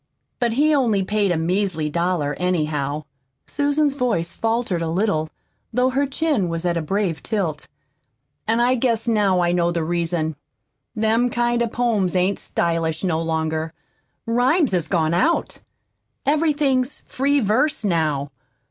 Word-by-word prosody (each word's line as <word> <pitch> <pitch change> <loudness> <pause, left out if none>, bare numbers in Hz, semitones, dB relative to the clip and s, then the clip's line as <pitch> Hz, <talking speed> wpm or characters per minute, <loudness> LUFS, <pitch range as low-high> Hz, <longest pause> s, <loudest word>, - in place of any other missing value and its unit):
but 240 -3 +1
he 300 +5 +3
only 230 -9 +2
paid 205 0 +1
a 175 - +1
measly 175 -1 0
dollar 170 -2 0
anyhow." 155 -5 -1 0.4
Susan's 290 0 +1
voice 230 -11 -1
faltered 225 -6 -1
a 165 - -1
little, 165 -3 0 0.4
though 250 +2 +2
her 280 +2 +1
chin 275 - 0
was 165 +1 -3
at 175 -1 +1
a 170 - 0
brave 185 0 -1
tilt. 175 -9 -2 0.8
"An' 225 +1 +2
I 245 +2 +3
guess 235 -2 0
now 205 -5 +2
I 175 0 +2
know 175 -1 +2
the 170 -1 -1
reason. 165 -1 -1 0.6
Them 225 +3 +2
kind 240 0 0
of 235 -1 0
poems 215 -7 0
ain't 185 +2 +1
stylish 165 -1 -1
no 165 -3 0
longer. 160 0 -2 0.5
Rhymes 250 - +2
has 175 -4 0
gone 160 -3 +1
out. 315 - +1 0.7
Everything's 290 -3 +1
'free 280 +2 0
verse' 250 +6 +1
now. 155 -7 0
195 Hz, 145 wpm, -22 LUFS, 165-245 Hz, 0.8 s, he